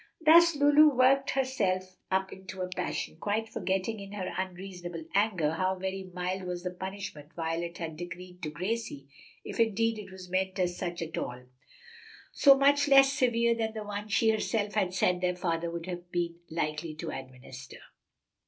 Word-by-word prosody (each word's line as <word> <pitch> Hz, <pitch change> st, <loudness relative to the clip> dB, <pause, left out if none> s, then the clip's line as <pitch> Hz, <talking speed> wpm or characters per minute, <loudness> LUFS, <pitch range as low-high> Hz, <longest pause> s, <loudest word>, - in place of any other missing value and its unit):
Thus 335 Hz, +1 st, +7 dB
Lulu 290 Hz, 0 st, +6 dB
worked 270 Hz, +2 st, +4 dB
herself 190 Hz, -9 st, -1 dB
up 190 Hz, 0 st, 0 dB
into 190 Hz, 0 st, -7 dB
a 180 Hz, -, -4 dB
passion, 180 Hz, -3 st, -3 dB
quite 210 Hz, +5 st, -1 dB
forgetting, 195 Hz, +1 st, -2 dB
in 200 Hz, 0 st, -9 dB
her 190 Hz, -3 st, -4 dB
unreasonable 180 Hz, -2 st, -5 dB
anger, 190 Hz, -7 st, +2 dB
how 185 Hz, +4 st, 0 dB
very 190 Hz, 0 st, -4 dB
mild 180 Hz, +1 st, -3 dB
was 180 Hz, -1 st, -4 dB
the 180 Hz, -, -2 dB
punishment 190 Hz, -5 st, -7 dB
Violet 170 Hz, +1 st, -3 dB
had 160 Hz, -2 st, -5 dB
decreed 180 Hz, +1 st, -8 dB
to 155 Hz, -, -3 dB
Gracie 180 Hz, -3 st, -4 dB, 0.4 s
(if -, -, -6 dB
indeed 225 Hz, 0 st, +2 dB
it 205 Hz, -, -9 dB
was 190 Hz, -1 st, -10 dB
meant 185 Hz, +1 st, -1 dB
as 180 Hz, -1 st, 0 dB
such 175 Hz, -2 st, -3 dB
at 160 Hz, -, -4 dB
all); 125 Hz, +1 st, -5 dB, 0.9 s
so 275 Hz, -2 st, +6 dB
much 285 Hz, +1 st, +4 dB
less 275 Hz, -1 st, +7 dB
severe 235 Hz, -3 st, +2 dB
than 225 Hz, -1 st, -2 dB
the 215 Hz, -, -4 dB
one 205 Hz, 0 st, -5 dB
she 220 Hz, +2 st, +3 dB
herself 215 Hz, -1 st, -1 dB
had 195 Hz, -4 st, +1 dB
said 180 Hz, -1 st, +2 dB
their 180 Hz, 0 st, +1 dB
father 170 Hz, -1 st, -1 dB
would 170 Hz, 0 st, -5 dB
have 175 Hz, -1 st, -7 dB
been 170 Hz, -1 st, -2 dB
likely 155 Hz, 0 st, -3 dB
to 160 Hz, +1 st, -5 dB
administer. 130 Hz, 0 st, -9 dB
185 Hz, 170 wpm, -29 LUFS, 175-220 Hz, 0.9 s, Thus